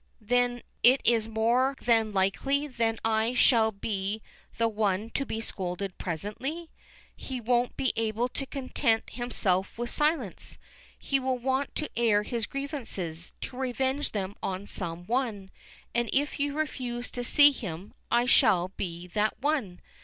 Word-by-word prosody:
Then 245 +2 +1 0.2
it 255 +3 +7
is 225 -2 +3
more 240 +5 +2
than 225 -2 +3
likely 205 +9 +1
that 230 -5 -1
I 225 +2 +2
shall 225 -3 +5
be 200 0 -3 0.3
the 230 - +3
one 210 0 0
to 275 +2 -1
be 220 - -3
scolded 185 -2 -4
presently. 235 - -4 0.4
He 260 -2 -5
won't 245 +1 +1
be 260 - +1
able 225 +1 0
to 275 +2 -5
content 255 -4 0
himself 210 -6 -1
with 240 0 -3
silence. 300 - 0 0.4
He 275 - 0
will 260 -1 0
want 265 +3 -1
to 305 - -2
air 220 -3 +3
his 230 -1 -2
grievances, 225 - -4
to - - -5
revenge 265 +2 -1
them 200 -1 -3
on 190 +1 -3
some 175 -3 -4
one, 220 -5 -1 0.4
and 235 -1 +1
if 290 +2 0
you 285 0 0
refuse 250 -5 -3
to 245 - -3
see 290 +4 +7
him, 195 - -6 0.2
I 240 +1 +3
shall 210 -8 +4
be 175 -2 -5
that 210 +4 0
one. 255 -10 -1
230 Hz, 150 wpm, -28 LUFS, 205-260 Hz, 0.4 s, it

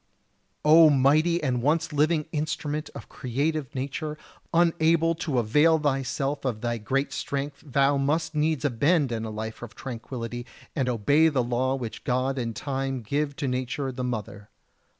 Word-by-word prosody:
O 160 +1 +8
mighty 155 +5 +3
and 125 -4 0
once 155 +4 +1
living 150 +1 +2
instrument 150 0 -2
of - - -8
creative 145 +3 -2
nature, 140 +3 -4 0.3
unable 165 -1 +3
to 160 -5 -2
avail 150 +8 +4
thyself 135 -1 -1
of 120 -5 -2
thy 120 -1 -1
great 135 +6 -1
strength 140 0 -4
thou 140 -1 +2
must 155 +4 0
needs 150 -1 0
abandon 135 -3 +1
a - - -4
life 110 +1 -6
of 115 -3 -9
tranquillity 120 -1 -6 0.3
and 130 -4 0
obey 140 +7 +3
the 135 -5 +1
law 125 +2 0
which 120 -4 -6
God 130 +2 0
and 115 -2 -3
time 135 -1 -3
gave 140 +5 -1
to 140 - -3
Nature 130 +2 -2
the 125 0 -5
mother. 105 -4 -5
140 Hz, 150 wpm, -26 LUFS, 125-155 Hz, 0.3 s, O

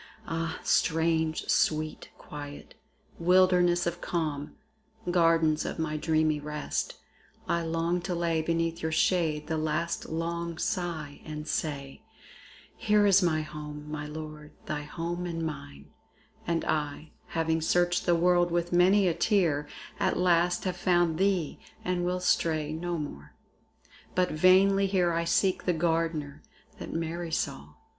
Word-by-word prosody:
Ah! 165 +1 -3
strange, 160 -1 +1
sweet 155 0 0
quiet! 145 -1 -9 0.5
wilderness 180 0 +4
of 175 0 -3
calm, 150 -4 -3 0.6
Gardens 165 -3 +3
of - - -4 0.2
dreamy 155 -2 +2
rest, 150 0 -3 0.5
I 170 - +1
long 165 +2 -1
to 175 0 -3
lay 170 -1 0
Beneath 165 +1 -1
your 160 - -1
shade 160 -2 +1
the 160 -1 -2
last 155 +2 -2
long 170 +1 -3
sigh, 165 -5 -3
and 150 0 -7
say, 140 +2 -3 0.7
Here 210 -2 +3
is 200 -1 +6
my 160 -3 +2
home, 150 -1 -8
my 150 -1 -4
Lord, 150 0 -8
thy 150 -1 -3
home 170 +4 -4
and 165 -1 -3
mine; 140 - -7 0.6
And 170 -1 0
I, 150 0 -2 0.3
having 160 0 +1
searched 175 +2 +1
the 175 - +5
world 175 +1 +3
with 175 0 -1
many 185 +3 +5
a 170 - +2
tear, 165 -8 +1 0.3
At - - +1
last 175 -1 +2
have 185 -1 -2
found 175 -2 +2
thee 190 -5 +1 0.3
and 180 -1 0
will 180 +1 0
stray 155 -3 +1
no 175 +2 -3
more. 75 - -7 0.8
But 180 0 +2
vainly 195 +4 +5
here 185 -3 +2
I 170 0 0
seek 185 +2 +1
the 180 - +2
Gardener 160 -3 -1 0.4
That - - -7
Mary 165 +1 -3
saw. 75 - -3
165 Hz, 135 wpm, -28 LUFS, 155-175 Hz, 0.8 s, is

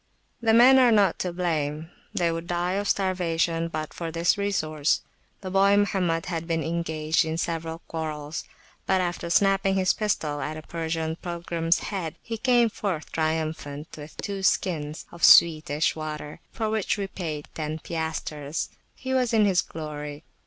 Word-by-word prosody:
The 225 -1 +3
men 260 +3 +8
are 250 -2 +6
not 200 -5 +3
to 180 - -1
blame; 160 -2 -2 0.2
they 170 -1 +1
would 165 +1 -4
die 175 0 0
of 200 +2 -1
starvation 170 -3 +1
but 155 -2 -5
for 165 -1 -4
this 165 +1 +2
resource. 155 -7 0 0.4
The 185 -2 -5
boy 195 +1 +5
Mohammed 185 -5 +1
had 165 -2 -3
been 165 -2 0
engaged 160 -1 0
in 160 0 -3
several 165 -1 -3
quarrels; 155 -1 -4 0.4
but 190 - +3
after 175 -1 -2
[p.67] - - -4
snapping 195 -1 +2
his 185 -1 +3
pistol 155 -9 -1
at 155 +1 -4
a 155 - -8
Persian 160 0 -3
pilgrims 170 -1 -1 0.2
head, 170 -5 -3
he 225 -2 -5
came 240 -2 +4
forth 185 -7 -3
triumphant 155 -2 -2
with 150 0 -11
two 200 -2 -4
skins 155 -5 0
of 170 - -11
sweetish 155 -2 +6
water, 150 -1 -6
for 220 - -2
which 220 -2 0
we 200 - -2
paid 160 -6 -5
ten 155 0 -3
piastres. 160 -2 -4 0.3
He 260 -1 -4
was 250 -2 +1
in 215 -1 +5
his 185 -4 +3
glory. 150 -1 -7
165 Hz, 165 wpm, -26 LUFS, 155-190 Hz, 0.4 s, men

